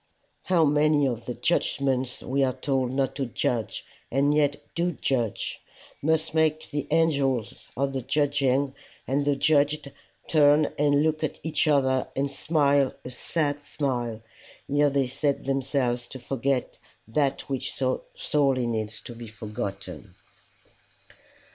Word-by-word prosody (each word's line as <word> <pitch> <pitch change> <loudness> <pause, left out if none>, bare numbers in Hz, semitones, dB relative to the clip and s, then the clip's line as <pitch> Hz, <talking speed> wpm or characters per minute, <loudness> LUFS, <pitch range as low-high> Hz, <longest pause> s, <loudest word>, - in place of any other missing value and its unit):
How 175 -3 +4
many 150 0 +3
of 120 -3 -2
the 125 - -4
judgments 135 -6 0
we 135 +2 +1
are 130 -1 +1
told 135 -3 0
not 135 0 0
to 135 -3 -1
judge 115 -1 -2 0.2
and 140 +3 +2
yet 145 -1 +2
do 175 +1 0
judge, 120 -7 -2 0.4
must 160 +1 +1
make 155 -1 +1
the 145 -1 -2
angels 140 -7 +2 0.2
of 135 +1 0
the 135 - -2
judging 140 0 +1 0.3
and 140 +2 +1
the 145 -1 +2
judged 145 0 +2 0.4
turn 150 -1 +4
and 145 0 +4
look 155 0 0
at 155 - -2
each 155 0 0
other 130 -3 +3
and 140 +1 0
smile 140 -2 +2
a 125 - -6
sad 145 +2 -1
smile, 125 -6 -3 0.4
ere 145 +1 +3
they 140 -1 +1
set 140 +3 -1
themselves 130 -3 0
to - - -9
forget 130 +1 -2 0.3
that 135 +4 0
which 135 -2 -3
so 130 -1 -1
sorely 135 -4 +1
needs 110 -2 -2
to 120 - -9
be 115 0 -9
forgotten. 105 -2 -6
140 Hz, 140 wpm, -26 LUFS, 130-145 Hz, 0.4 s, How